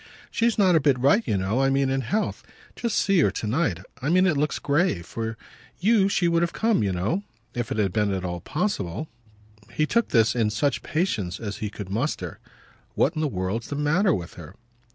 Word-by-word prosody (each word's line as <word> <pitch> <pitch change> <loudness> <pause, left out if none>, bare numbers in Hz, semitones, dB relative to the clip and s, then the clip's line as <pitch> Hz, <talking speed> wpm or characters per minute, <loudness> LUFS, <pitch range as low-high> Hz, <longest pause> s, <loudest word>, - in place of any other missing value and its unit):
"She's 230 0 +1
not 190 -4 +4
a - - +6
bit 140 -3 +3
right, 140 - +4
you 100 - +1
know. 100 +7 0
I 135 - +3
mean 135 0 +2
in 135 0 0
health. 205 - -1 0.3
Just 235 -3 -1
see 195 -2 +3
her 140 - +4
to 100 - -4
night. 110 - 0 0.2
I 135 - -1
mean 185 +2 +4
it 175 -5 +2
looks 150 +2 0
grave. 140 - +1
For 110 +1 -4 0.4
you 200 0 +4
she 185 -3 +2
would 170 0 +2
have 170 0 0
come, 225 -1 +2
you 100 -2 +1
know, 95 - -1 0.3
if 120 -2 -3
it - - -1
had 100 -4 +1
been 105 -2 +1
at 95 -1 -2
all 90 -1 -3
possible." 150 - -2 0.6
He 155 - +1
took 235 +8 +1
this 110 -2 +3
in 115 -3 +2
such 120 +1 0
patience 110 - -1
as 105 -3 -5
he 105 - -3
could 100 -2 -8
muster. 125 +9 -2 0.6
"What - - +2
in 155 - -3
the 155 - +1
world's 100 0 -3
the 145 - -4
matter 160 +7 +2
with 90 - -3
her?" 85 +4 -12
135 Hz, 215 wpm, -25 LUFS, 105-170 Hz, 0.6 s, a